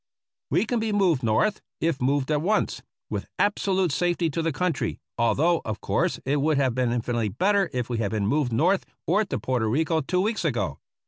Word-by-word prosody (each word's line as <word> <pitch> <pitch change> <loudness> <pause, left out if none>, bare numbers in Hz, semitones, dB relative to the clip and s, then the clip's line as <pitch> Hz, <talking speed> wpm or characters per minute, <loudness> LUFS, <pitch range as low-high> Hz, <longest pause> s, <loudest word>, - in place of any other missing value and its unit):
We - - +2
can 240 +1 0
be 220 0 -1
moved 185 -9 +2
North, 115 - +1 0.2
if 165 -5 0
moved 135 +2 +1
at 150 -1 +2
once, 210 +6 0 0.3
with - - -3
ab 205 - +3
solute 190 -4 +1
safety 175 +1 0
to 165 - -1
the 165 0 0
country, 165 +1 -1 0.2
although, 160 +8 +2
of 110 -1 -4
course, - - 0
it 140 +3 +1
would 155 0 +2
have 130 -3 +2
been 125 -1 0
infinitely 120 -2 -1
better 195 - +2
if 125 -2 -2
we 120 -2 -2
had 105 -3 0
been 105 -1 -1
moved 140 +2 +1
North 175 - +2 0.2
or 200 +6 +3
to 195 - -3
Porto 125 -4 0
Rico 160 +7 +1
two 180 +6 -1
weeks 215 +1 -1
ago. 120 - -1
150 Hz, 205 wpm, -25 LUFS, 120-180 Hz, 0.3 s, ab